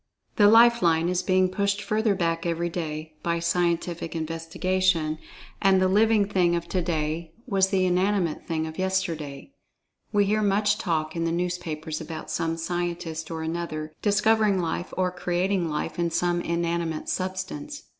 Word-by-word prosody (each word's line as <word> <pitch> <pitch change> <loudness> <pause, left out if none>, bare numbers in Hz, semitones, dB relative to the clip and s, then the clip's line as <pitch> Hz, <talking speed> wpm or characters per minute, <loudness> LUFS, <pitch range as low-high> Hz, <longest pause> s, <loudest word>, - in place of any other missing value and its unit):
The 205 - +7
"Life 235 +1 +6
line" 165 0 +3
is 180 0 +1
being 185 0 +3
pushed 200 +1 0
further 215 -1 +1
back 165 -2 0
every 170 0 -1
day, 160 -2 -5
by 170 0 0
scientific 170 0 -1
investigation, 165 0 0 0.4
and 195 -2 +5
the 185 - +3
"living" 210 +2 +4
thing 180 -4 +2
of 170 0 -3
today 165 -2 -2
was 195 -5 +2
the 190 -2 +2
"inanimate" 180 -2 0
thing 160 -2 -1
of 160 +2 -7
yesterday. 175 - -2 0.6
We 205 -1 +3
hear 215 +2 +1
much 205 +1 +2
talk 160 -3 -1
in 165 0 -1
the 165 - 0
newspapers 165 -3 -3
about 160 0 -7
some 165 -1 -1
scientist, 170 -1 -3
or 160 -1 -4
another, 160 -2 -4
"discovering 210 0 +3
life," 175 +1 -3
or 185 -1 +1
"creating 180 0 0
life," 150 +3 -3
in 170 -1 +1
some 175 +1 0
"inanimate 170 -2 -2
substance." 190 +11 -4
175 Hz, 155 wpm, -26 LUFS, 165-190 Hz, 0.6 s, The